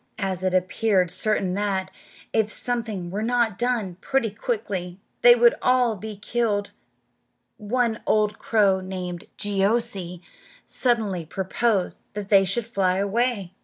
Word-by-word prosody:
As 190 -3 -2
it 185 0 0
appeared 185 -1 +1
certain 195 -1 0
that, 195 -1 -1 0.4
if 215 -1 +1
something 220 -9 -2
were 205 +3 -3
not 230 -3 +1
done 235 -8 -1
pretty 265 -6 0
quickly, 200 -5 -3 0.2
they 240 0 +8
would 240 0 +5
all 250 -3 +3
be 215 +2 -7
killed, 205 -1 -1 0.9
one 230 +1 -1
old 210 0 +2
crow, 200 -4 +3
named 180 -2 -6
Jeeoo'see, 200 -3 -1 0.4
suddenly 220 -8 0
proposed 190 +4 -1
that 205 -1 -5
they 195 -2 +6
should 210 +5 -1
fly 195 -5 0
away. 200 -1 0
205 Hz, 130 wpm, -24 LUFS, 190-230 Hz, 0.9 s, they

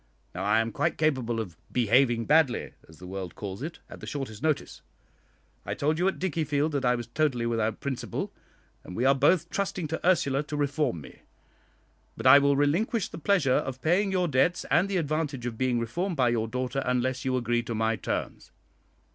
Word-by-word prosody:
Now 90 - -4
I 105 +3 +3
am 115 0 -3
quite - - -1
capable 130 -7 0
of 95 -7 -5 0.2
'behaving 120 0 +3
badly,' 150 -5 +2 0.2
as 80 - -15
the 90 - -11
world 95 -1 -6
calls 100 +1 -6
it, 160 +3 -5
at - - -11
the - - -9
shortest 130 -7 -5
notice. 155 -2 -1 0.8
I - - -4
told 155 +3 0
you 180 - +2
at 190 - 0
Dickiefield 155 -4 0
that 140 -2 -1
I 125 0 +3
was 120 -1 -4
totally 125 -1 0
without 115 -2 -1
principle, 135 -3 -4 0.5
and 90 - -9
we 120 - 0
are 135 - +6
both 155 +5 +2
trusting 190 -4 -2
to 160 - -4
Ursula 145 -6 +2
to 150 0 -5
reform 145 - 0
me. 65 - -14 1.0
But - - -7
I 135 +2 +9
will 140 0 +3
relinquish 180 - +1
the 165 - -8
pleasure 165 -8 +2
of 130 -1 -2
paying 190 +5 +2
your 180 -2 +1
debts, 155 +5 +1
and 185 +3 +3
the 195 - 0
advantage 150 -5 -2
of 120 -2 -3
being 130 -2 +1
reformed 175 - -2
by 125 -4 +3
your 115 -2 0
daughter, 125 +3 -2
unless 125 0 0
you 130 -1 0
agree 120 -1 0
to 115 -1 -5
my 110 +1 +1
terms." - - -4
135 Hz, 195 wpm, -27 LUFS, 120-155 Hz, 1.0 s, I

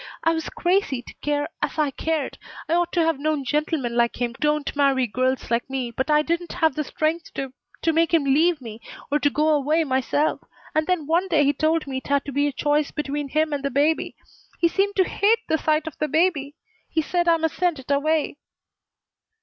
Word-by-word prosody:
I 330 - +4
was 320 -1 -3
crazy 350 -9 0
to - - -12
care 290 0 0
as - - -2
I 300 -2 +1
cared. 315 +1 -2 0.3
I - - 0
ought 345 0 +1
to 340 - +3
have 325 -4 0
known 300 -2 -1
gentlemen 295 -4 -1
like 235 0 +1
him 240 -1 -1
don't 300 -1 0
marry 275 -3 +3
girls 255 +3 -1
like 235 +2 0
me, 260 -3 -3
but 265 +5 -3
I 300 0 +4
didn't 340 +2 -2
have 320 -4 +2
the 305 - -2
strength 315 +4 -2
to 270 -1 -4 0.3
to 325 - +2
make 330 0 +2
him 330 -3 +3
leave 305 +3 +3
me, 225 -2 -9 0.3
or 295 - +2
to 290 - +3
go 300 +2 +1
away 305 +2 +2
myself. 275 +2 0 0.3
And 310 0 +1
then 360 -5 0
one 340 +5 +1
day 310 -5 +3
he 285 - +3
told 315 +1 +1
me 270 -2 -4
it 260 - -7
had 280 0 +1
to 285 - -5
be 285 +2 +1
a - - -1
choice 295 +2 +1
between 290 -1 -3
him 310 +1 +1
and 280 -1 -3
the 280 - 0
baby. 290 +4 +1 0.4
He 340 - +3
seemed 395 +3 0
to 380 - +4
hate 435 +5 +1
the 320 - +1
sight 310 0 +1
of 320 - -6
the 305 - 0
baby. 300 -2 +1 0.3
He 320 -1 0
said 345 +2 0
I 335 -1 +5
must 320 -1 -1
send 350 -3 +1
it 265 +1 -7
away." 300 +1 +1
300 Hz, 220 wpm, -23 LUFS, 275-325 Hz, 0.4 s, I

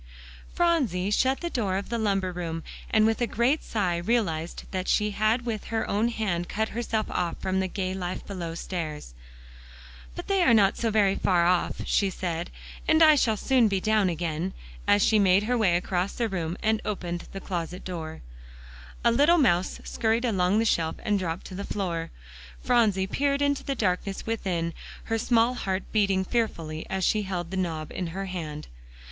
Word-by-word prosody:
Phronsie 260 - +1
shut 260 +5 +2
the 345 - -2
door 200 -6 0
of 200 - -5
the 235 0 -1
lumber 195 -3 0
room, 165 -2 -4 0.3
and 215 -1 +4
with 225 +2 +1
a 240 - +2
great 250 +8 +1
sigh 185 -6 -1
realized 175 -4 -1
that 185 -1 -3
she 210 -1 +2
had 215 +4 +1
with 220 -4 -3
her 225 -1 -2
own 210 +3 +1
hand 200 -7 -2
cut 220 +1 -1
herself 225 -1 -1
off 175 -1 -1
from 190 0 -1
the 190 - 0
gay 185 0 -3
life 185 -1 -4
below 175 -4 -5
stairs. 155 - -5 1.0
"But - - -6
they 390 -1 +2
are 245 -10 +5
not 200 -3 +4
so 230 - -1
very 205 -3 +3
far 175 -3 +2
off," 180 0 +1
she 200 - +2
said, 175 -2 -3 0.4
"and 315 +1 +5
I 310 -1 +8
shall 230 -7 +2
soon 255 0 +3
be 195 -2 0
down 215 -1 +2
again," 170 +1 -2 0.3
as 205 0 +5
she 220 - +4
made 195 0 +4
her 245 +3 0
way 205 -7 +3
across 180 +1 -1
the 235 - -1
room 175 -4 -3
and 220 0 +2
opened 175 -4 -4
the 195 - -6
closet 180 -1 -5
door. 160 -3 -6 0.8
A 235 - +6
little 295 +8 +5
mouse 185 - +2
scurried 225 +2 0
along 195 -3 +2
the 225 - +2
shelf 165 -7 +1
and 205 -2 +1
dropped 170 -2 -3
to - - -9
the 195 +2 -4
floor. 170 -6 -3 0.5
Phronsie 220 -6 +3
peered 280 +7 0
into 285 -1 +1
the 275 - -2
darkness 195 -2 -1
within, 180 -7 -2 0.3
her 225 0 -1
small 235 +1 +3
heart 190 -6 -2
beating 195 -3 +2
fearfully 165 -9 -2
as 190 0 -2
she 215 +4 +2
held 180 -3 -4
the - - -3
knob 160 -4 -2
in 180 - -3
her 190 +4 -4
hand. 160 -5 -5
195 Hz, 190 wpm, -27 LUFS, 175-225 Hz, 1.0 s, I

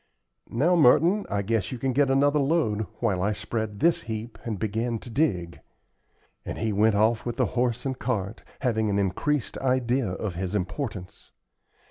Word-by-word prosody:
"Now, 155 +10 +2
Merton, 170 +7 +4
I 100 -1 -1
guess 110 -2 -1
you 130 - -4
can 130 +2 -1
get 140 +1 +3
another 145 +2 +3
load, 135 -8 +1
while 100 -6 +1
I 105 +3 +1
spread 105 0 -4
this 170 0 +3
heap 115 0 -6
and 110 -3 -3
begin 115 +3 -1
to 120 +2 -9
dig;" 95 - 0 0.8
and - - -5
he 110 -2 -1
went 105 +1 +3
off 110 +2 +2
with 120 - -3
the - - +2
horse 125 0 0
and 130 -1 -3
cart, 105 -4 -2 0.2
having 110 -4 +1
an 100 - +1
increased 105 +9 -1
idea 130 -1 +1
of 100 0 -3
his 95 +3 -3
importance. 100 -1 -4
115 Hz, 170 wpm, -26 LUFS, 105-135 Hz, 0.8 s, Merton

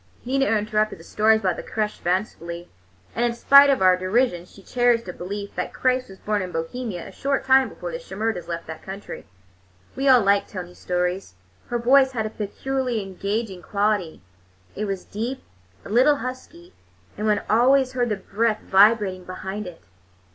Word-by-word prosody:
Nina 270 +2 +1
interpreted 215 0 0
the 165 - -14
stories 220 +4 +2
about 185 -4 0
the - - -4
crêche 215 -1 -3
fancifully, 175 -2 -3 0.4
and 235 - -1
in 240 -1 0
spite 280 +3 +7
of 265 -8 +2
our 185 -1 +6
derision 185 -1 0
she 195 +2 -17
cherished 245 -1 +1
a 180 - -5
belief 200 +3 -6
that - - -4
Christ 255 -2 0
was 190 - -12
born 210 0 -1
in 180 -1 -5
Bohemia 175 +3 -4
a - - -10
short 275 +6 -2
time 265 0 +5
before - - -7
the - - -5
Shimerdas 220 - -3
left 170 -1 -5
that 160 0 -8
country. 195 +2 -8 0.7
We 270 +1 +1
all 255 -2 +7
liked 200 0 +2
Tony's 180 -2 -8
stories. 180 - -2 0.3
Her 240 - -1
voice 265 +3 +4
had 220 -3 -1
a 215 - -4
peculiarly 245 +2 -3
engaging 195 +1 -4
quality; 200 -4 -1 0.5
it 215 - -2
was 195 -2 -4
deep, 240 +6 -5 0.4
a - - -9
little 255 +7 +5
husky, 280 +8 -8 0.4
and 215 - -2
one 210 -1 +2
always 255 +3 +4
heard 245 -2 0
the 210 - 0
breath 215 +3 -1
vibrating 195 -2 +4
behind 190 +2 -6
it. 175 - -11
215 Hz, 175 wpm, -23 LUFS, 190-250 Hz, 0.7 s, spite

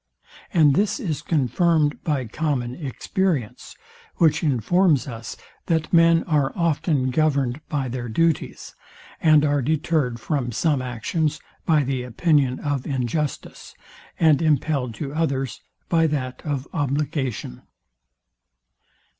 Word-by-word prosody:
And 150 -4 +5
this 205 - +1
is 165 - -3
confirmed 155 +1 +1
by 145 -5 -1
common 125 -1 -2
experience, 145 - -3 0.4
which 160 -2 +3
informs 150 - +2
us, 115 -5 -7 0.3
that 160 -1 0
men 165 0 +5
are 145 -5 +1
often 150 -5 0
governed 140 -2 +1
by 140 -3 -1
their 120 -1 -5
duties, 165 +7 -1 0.5
and 155 -2 +5
are 145 -1 +1
detered 145 -3 0
from 125 -1 -2
some 140 +3 +1
actions 145 +6 -2 0.3
by 155 -3 +4
the 130 -1 -2
opinion 130 +1 +1
of 145 -3 -2
injustice, 140 +2 -3 0.4
and 160 -3 +4
impelled 145 -6 0
to 140 +4 -5
others 135 -5 -2 0.3
by 165 -1 +3
that 130 -4 -3
of 140 -2 -3
obligation. 140 - -2
145 Hz, 115 wpm, -23 LUFS, 130-160 Hz, 0.5 s, And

